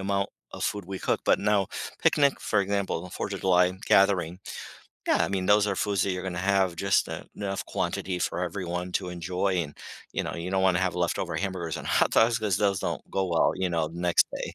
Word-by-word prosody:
amount 100 0 -1 0.2
of - - -7
food 105 -3 -1
we 95 0 -6
cook. - - 0
But - - +3
now, 100 -2 +2 0.3
picnic, 140 -2 +3
for 105 - +1
example, 100 -3 -1
the 90 - -9
4th 100 - -4
of - - -5
July 90 -1 +4
gathering, 90 -3 +3 0.7
yeah, - - +3
I - - +1
mean, 95 -1 -1
those 105 +1 +4
are 100 - -1
foods 100 -2 0
that 95 - 0
you're 90 - -4
gonna 90 - -4 0.2
have 95 -3 +2
just 100 +1 +2 0.3
enough 95 -2 -3
quantity 90 -1 -2
for 90 - -1
everyone 90 0 -3
to 90 -1 -1
enjoy 90 +2 -1
and, 75 -2 -9 0.4
you - - -1
know, - - -4
you 85 +2 -4
don't 95 0 +1
wanna 90 -2 +4
have 90 - -3
leftover 90 -1 -1
hamburgers 90 -5 -3
and - - -7
hot - - +3
dogs 115 +1 +4
because 105 -5 0
those 100 -2 +1
don't - - -3
go 95 -1 0
well, 85 -2 +3
you 95 -1 -1
know, 80 -2 0
the 85 +2 -8
next 90 -1 +4
day. - - -5
95 Hz, 225 wpm, -27 LUFS, 90-100 Hz, 0.7 s, July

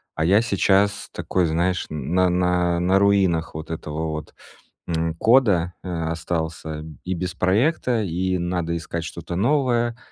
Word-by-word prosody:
а 80 - 0
я 100 +5 +5
сейчас 100 -2 +2
такой, 90 -2 0
знаешь, 85 +3 0
на 85 +5 +1
на 90 -1 +1
на 95 +2 +3
руинах 95 -6 +2
вот 80 +1 -6
этого 80 0 -4
вот 75 0 -6 0.5
м 80 -1 -1
кода 100 -5 +3
а 80 -3 -3
остался 80 -2 -4 0.2
и 95 - -2
без 90 0 -3
проекта, 115 - +1
и 95 0 -1
надо 85 -1 -2
искать 85 +1 -5
что-то 85 +2 -6
новое. 120 +1 +1
90 Hz, 140 wpm, -23 LUFS, 80-100 Hz, 0.5 s, я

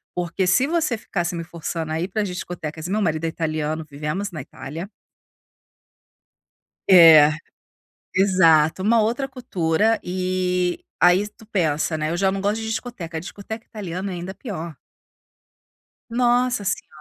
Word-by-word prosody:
Porque, 180 +1 -1
se 225 +9 +4
você 310 -5 0
ficasse 175 -4 -3
me 170 - -4
forçando 165 -1 -5
a 160 - -1
ir 180 - -1
para 210 +2 -1
as - - -2
discotecas" 170 -3 -6
meu 205 +4 0
marido 160 -4 0
é - - +1
italiano, 155 -1 -2
vivemos 150 +7 -4
na 155 - -6
Itália. 150 +9 -8 2.0
É, 160 -5 +9 0.8
exato. 180 -4 +4
Uma 225 +3 +4
outra 240 +5 0
cultura, 220 -4 0
eh, 180 -1 -1 0.2
aí 180 +4 +4
tu 220 +1 -19
pensa, 160 -6 0
né: 155 0 -2
"Eu 170 - -1
já 190 +1 +2
não 195 - -3
gosto 205 +2 0
de 220 - -4
discoteca", 190 -9 -5
discoteca 205 +5 -8
italiana, 190 -2 -5
ainda 180 +2 -6
pior. 170 - -7 1.3
Nossa 245 -1 +2
senhora! 195 - -2
180 Hz, 140 wpm, -22 LUFS, 160-210 Hz, 2.0 s, É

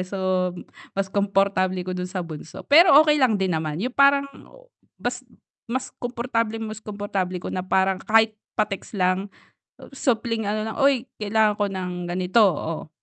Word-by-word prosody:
so 195 - -5 0.8
mas 195 -1 -2
komportable 195 -2 +1
ko 185 - -4
dun 180 0 -4
sa 185 -1 -4
bunso, 155 -1 -9
pero 320 +1 +7
okey 300 -2 +3
lang 245 -5 +4
din 190 -2 0
naman, 155 -2 -2
yung 250 - -3
parang 280 +1 +5 0.7
mas - - -3 0.5
mas 260 +2 -3
komportableng, 230 -2 -2
mas 215 -1 -7
komportable 205 -3 -3
ko 180 - -6
na 185 - -2
parang 190 +1 +1
kahit 220 0 +3 0.2
pa-text 210 0 -2
lang, 185 +1 +1 0.7
supling 230 -3 0
ano 210 +1 -1
lang, 220 - -6
"Oy 270 -3 +2
kailangan 210 0 +1
ko 205 - 0
ng 185 -1 -4
ganito, 180 +5 +2
oh" 165 -4 -1
205 Hz, 155 wpm, -23 LUFS, 185-230 Hz, 0.8 s, pero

